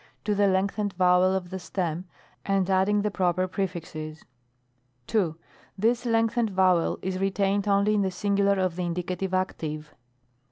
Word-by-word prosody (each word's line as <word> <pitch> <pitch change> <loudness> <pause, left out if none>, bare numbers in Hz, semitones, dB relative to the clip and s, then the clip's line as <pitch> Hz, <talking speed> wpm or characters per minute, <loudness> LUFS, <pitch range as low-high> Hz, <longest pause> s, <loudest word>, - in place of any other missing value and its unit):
to 210 - 0
the 200 0 +3
lengthened 200 +2 0
vowel 180 +1 +4
of 180 -1 -4
the 190 - -4
stem, 175 -2 -3 0.4
and 195 -1 +1
adding 200 +2 +2
the 210 - 0
proper 185 -1 +1
prej&xes. 165 -5 -5 0.8
2. 175 - 0 0.4
This 235 +4 +1
lengthened 230 0 +2
vowel 185 -3 +2
is 185 0 -2
retamed 195 +1 0
only 200 +1 +3
in 210 - +2
the 190 - +1
singular 200 +1 +1
of 185 -2 0
the 180 - -1
Indicative 180 +2 -3
Active. 155 -5 -3
190 Hz, 150 wpm, -26 LUFS, 180-200 Hz, 0.8 s, vowel